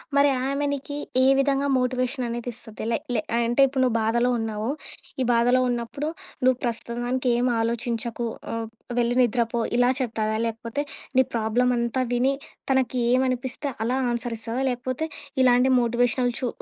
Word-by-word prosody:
మరి 285 Hz, 0 st, +5 dB, 0.2 s
ఆమె 280 Hz, +1 st, 0 dB
నీకి 285 Hz, +1 st, -5 dB, 0.3 s
ఏ -, -, +5 dB
విధంగా 275 Hz, 0 st, +2 dB
మోటివేషననేది 250 Hz, -1 st, -1 dB
ఇస్తది. 225 Hz, -2 st, -8 dB
లే 230 Hz, -, +2 dB, 0.2 s
లే 215 Hz, -, +1 dB, 0.2 s
అంటే, 235 Hz, +3 st, +2 dB
ఇప్పుడు 265 Hz, 0 st, -1 dB
నువ్వు 245 Hz, -3 st, +2 dB
బాధలో 235 Hz, +2 st, +2 dB
ఉన్నావు, 220 Hz, +1 st, -2 dB, 0.5 s
ఈ -, -, +3 dB
బాధలో 245 Hz, +2 st, +4 dB
ఉన్నప్పుడు 240 Hz, +5 st, -3 dB, 0.4 s
"నువ్వు 255 Hz, -1 st, +4 dB
ప్రస్తుతానికేమాలోచించకు, 235 Hz, -1 st, -1 dB, 0.2 s
హ్మ్, 230 Hz, -1 st, -3 dB, 0.3 s
వెళ్ళి 240 Hz, 0 st, +1 dB
నిద్రపో" 235 Hz, 0 st, +1 dB, 0.2 s
ఇలా 245 Hz, 0 st, +4 dB
చెప్తాదా? 220 Hz, -3 st, -1 dB
లేకపోతే 230 Hz, +5 st, -3 dB, 0.3 s
నీ 260 Hz, -, +7 dB
ప్రాబ్లమంతా 235 Hz, +2 st, +1 dB
విని 255 Hz, +3 st, +2 dB, 0.4 s
తనకి 260 Hz, -1 st, +1 dB
ఏవనిపిస్తే 260 Hz, +2 st, 0 dB
అలా 250 Hz, +3 st, 0 dB
ఆన్సరిస్తదా? 235 Hz, +1 st, -3 dB
లేకపోతే, 255 Hz, +5 st, -2 dB, 0.4 s
ఇలాంటి 250 Hz, +1 st, +5 dB
మోటివేషనల్ 245 Hz, +1 st, +1 dB
చు 250 Hz, -, -1 dB
245 Hz, 130 wpm, -25 LUFS, 235-255 Hz, 0.5 s, నీ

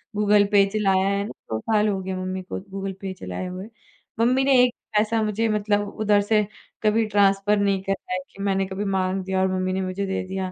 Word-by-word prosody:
Google 205 Hz, 0 st, +4 dB
पे 200 Hz, -1 st, +6 dB
चलाया 195 Hz, -2 st, +2 dB
है 200 Hz, 0 st, 0 dB
ना, 215 Hz, -, -7 dB, 0.2 s
2 110 Hz, -, -1 dB
साल 215 Hz, -, +1 dB
हो 195 Hz, -2 st, -1 dB
गए 190 Hz, 0 st, -4 dB
मम्मी 185 Hz, 0 st, -3 dB
को 185 Hz, -, -5 dB
गूगल 195 Hz, 0 st, -4 dB
पे 190 Hz, -1 st, -4 dB
चलाए 95 Hz, -, -6 dB
हुए। 185 Hz, +3 st, -7 dB, 0.5 s
मम्मी 255 Hz, +3 st, +3 dB
ने 270 Hz, -1 st, +4 dB
1 245 Hz, -1 st, +2 dB, 0.2 s
पैसा 220 Hz, +1 st, +2 dB
मुझे 215 Hz, +2 st, 0 dB
मतलब 205 Hz, -1 st, 0 dB
उधर 205 Hz, -1 st, +3 dB
से 210 Hz, 0 st, +2 dB, 0.4 s
कभी 220 Hz, +1 st, +3 dB
ट्रांसफर 200 Hz, 0 st, +3 dB
नहीं 200 Hz, -1 st, +1 dB
करा 195 Hz, -1 st, -3 dB
है 185 Hz, -, 0 dB
कि 195 Hz, -, -10 dB
मैंने 195 Hz, -1 st, +1 dB
कभी 195 Hz, +2 st, -4 dB
माँग 190 Hz, -1 st, 0 dB
दिया 190 Hz, 0 st, -1 dB
और 190 Hz, -, +3 dB
मम्मी 185 Hz, 0 st, -1 dB
ने 190 Hz, -, -1 dB
मुझे 185 Hz, +1 st, -3 dB
दे 190 Hz, -, -2 dB
दिया। 190 Hz, 0 st, -3 dB
195 Hz, 225 wpm, -24 LUFS, 190-210 Hz, 0.5 s, पे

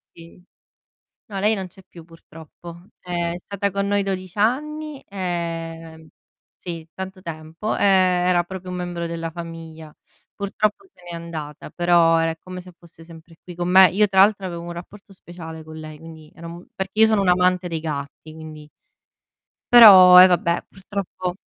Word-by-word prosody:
Sì. 170 Hz, +2 st, -16 dB, 0.9 s
No 200 Hz, -2 st, -6 dB
lei 210 Hz, +2 st, +2 dB
non 190 Hz, -2 st, -5 dB
c'è 190 Hz, +2 st, -18 dB
più 170 Hz, -2 st, -14 dB
purtroppo. 165 Hz, +1 st, -14 dB
È 175 Hz, -1 st, -3 dB
stata 200 Hz, +2 st, -4 dB
con 200 Hz, +1 st, -2 dB
noi 205 Hz, 0 st, 0 dB
12 185 Hz, -1 st, -5 dB
anni, 300 Hz, +6 st, -2 dB
e 165 Hz, -3 st, -5 dB, 0.5 s
sì 165 Hz, -2 st, -8 dB
tanto 190 Hz, 0 st, -8 dB
tempo, 165 Hz, +5 st, -5 dB
e -, -, -2 dB
era 180 Hz, -2 st, +3 dB
proprio 185 Hz, 0 st, -9 dB
un 180 Hz, -, -5 dB
membro 175 Hz, -1 st, -5 dB
della 165 Hz, -1 st, -5 dB
famiglia. 165 Hz, -2 st, -10 dB, 0.4 s
Purtroppo 210 Hz, -, -3 dB
se -, -, -23 dB
n'è 175 Hz, -1 st, -8 dB
andata 160 Hz, -3 st, -8 dB
però 170 Hz, -1 st, +3 dB
è 165 Hz, 0 st, 0 dB
come 185 Hz, +1 st, -9 dB
se 180 Hz, 0 st, -14 dB
fosse 165 Hz, -1 st, -16 dB
sempre 165 Hz, 0 st, -16 dB
qui 180 Hz, -, -11 dB
con 175 Hz, 0 st, -3 dB
me. 190 Hz, 0 st, +7 dB
Io 210 Hz, +3 st, +2 dB
tra 190 Hz, 0 st, +4 dB
l'altro 200 Hz, -1 st, +3 dB
avevo 170 Hz, -2 st, -6 dB
un 175 Hz, 0 st, -8 dB
rapporto 195 Hz, +4 st, -12 dB
speciale 165 Hz, -3 st, -11 dB
con 155 Hz, 0 st, -12 dB
lei, 155 Hz, -1 st, -10 dB
quindi 160 Hz, -1 st, -14 dB
era 170 Hz, -, -11 dB
un 170 Hz, +1 st, -11 dB
perché 190 Hz, +3 st, -5 dB
io -, -, +9 dB
sono 215 Hz, -2 st, +2 dB
un 195 Hz, -, -1 dB
amante 180 Hz, 0 st, +2 dB
dei 165 Hz, -2 st, -4 dB
gatti, 150 Hz, 0 st, -7 dB
quindi 155 Hz, -1 st, -11 dB, 1.0 s
però 185 Hz, -6 st, +10 dB
eh 185 Hz, -, +9 dB
vabbè, 175 Hz, -1 st, 0 dB
purtroppo 190 Hz, -2 st, -6 dB
175 Hz, 170 wpm, -21 LUFS, 165-190 Hz, 1.0 s, però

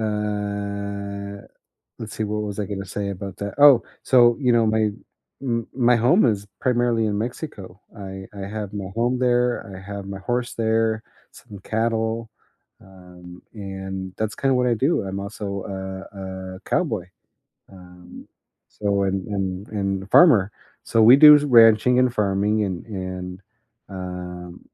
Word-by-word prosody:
uh, 100 Hz, -1 st, -4 dB, 0.6 s
let's 110 Hz, -1 st, -7 dB
see, 110 Hz, -, -2 dB
what 105 Hz, 0 st, -2 dB
was 105 Hz, -1 st, -5 dB
I 105 Hz, -, -1 dB
going 100 Hz, 0 st, -5 dB
to -, -, -8 dB
say 100 Hz, +1 st, -4 dB
about 100 Hz, -1 st, -7 dB
that 100 Hz, 0 st, -5 dB
oh, 145 Hz, -4 st, +7 dB, 0.2 s
so, 120 Hz, -2 st, +5 dB
you 125 Hz, -3 st, +2 dB
know, 115 Hz, -1 st, +3 dB
my 110 Hz, -1 st, +2 dB, 0.5 s
m 115 Hz, -3 st, -2 dB
my 125 Hz, -1 st, +3 dB
home 125 Hz, -, +4 dB
is 105 Hz, -4 st, 0 dB
primarily 120 Hz, -2 st, +1 dB
in 105 Hz, -1 st, -1 dB
Mexico. 105 Hz, -, -6 dB, 0.2 s
I 95 Hz, -1 st, -8 dB
I 100 Hz, -1 st, -6 dB
have 105 Hz, -1 st, -6 dB
my 100 Hz, -2 st, -4 dB
home 120 Hz, +2 st, +1 dB
there, 125 Hz, -1 st, +1 dB
I 95 Hz, -, -9 dB
have 100 Hz, -1 st, -6 dB
my 100 Hz, 0 st, -6 dB
horse 120 Hz, +4 st, -2 dB
there, 110 Hz, -1 st, 0 dB, 0.3 s
some 105 Hz, -4 st, -13 dB
cattle, 115 Hz, 0 st, -1 dB, 0.5 s
um, 90 Hz, -1 st, -14 dB
and 95 Hz, -2 st, -6 dB
that's 110 Hz, -1 st, -2 dB
kinda 135 Hz, -1 st, +1 dB
what 125 Hz, -1 st, +2 dB
I 120 Hz, -, +2 dB
do. 140 Hz, +9 st, +1 dB
I'm 95 Hz, 0 st, -5 dB
also 100 Hz, -1 st, -5 dB
a 95 Hz, -1 st, -7 dB
a -, -, -16 dB
cowboy. 115 Hz, -, -1 dB, 0.7 s
Um, 90 Hz, -1 st, -14 dB, 0.4 s
so, 100 Hz, -1 st, -1 dB
and 95 Hz, -1 st, -1 dB
and 95 Hz, -1 st, -3 dB
and 100 Hz, -2 st, -2 dB
a -, -, -14 dB
farmer. 105 Hz, -, +5 dB, 0.3 s
So, 115 Hz, -, +2 dB
we 120 Hz, +4 st, +9 dB
do 150 Hz, +1 st, +10 dB
ranching 120 Hz, -3 st, +5 dB
and 125 Hz, -1 st, +2 dB
farming 105 Hz, +1 st, +1 dB
and 95 Hz, -3 st, -5 dB
and, 95 Hz, -3 st, -6 dB, 0.5 s
um, 90 Hz, -1 st, -7 dB
105 Hz, 155 wpm, -22 LUFS, 95-115 Hz, 0.7 s, do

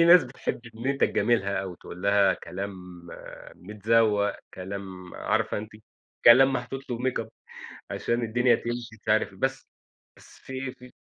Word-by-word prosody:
في -, -, +7 dB
ناس 170 Hz, -2 st, +8 dB
بتحب 125 Hz, -1 st, -4 dB
إن 115 Hz, +3 st, -6 dB
أنت 140 Hz, 0 st, 0 dB
تجاملها 100 Hz, -5 st, +2 dB
أوي، 95 Hz, -2 st, -6 dB
تقول 90 Hz, -, -10 dB
لها 100 Hz, -1 st, +4 dB
كلام 95 Hz, +4 st, -6 dB, 0.8 s
متزوق، 105 Hz, +1 st, +1 dB, 0.2 s
كلام 95 Hz, -1 st, -7 dB
عارفة -, -, 0 dB
أنتِ. 105 Hz, +1 st, -8 dB, 0.5 s
كلام 135 Hz, +3 st, +8 dB
محطوط 130 Hz, +1 st, -4 dB
له 120 Hz, -, -2 dB
makeup 125 Hz, -3 st, -1 dB, 0.6 s
عشان 120 Hz, +1 st, -1 dB
الدنيا 120 Hz, +2 st, +3 dB
تمشي، 120 Hz, 0 st, -4 dB
مش -, -, -30 dB
عارف 110 Hz, 0 st, +3 dB
إيه. -, -, -16 dB
بس 135 Hz, 0 st, -1 dB, 0.5 s
بس -, -, -17 dB
في 130 Hz, 0 st, -5 dB
في 125 Hz, 0 st, -15 dB
115 Hz, 150 wpm, -27 LUFS, 100-125 Hz, 0.8 s, ناس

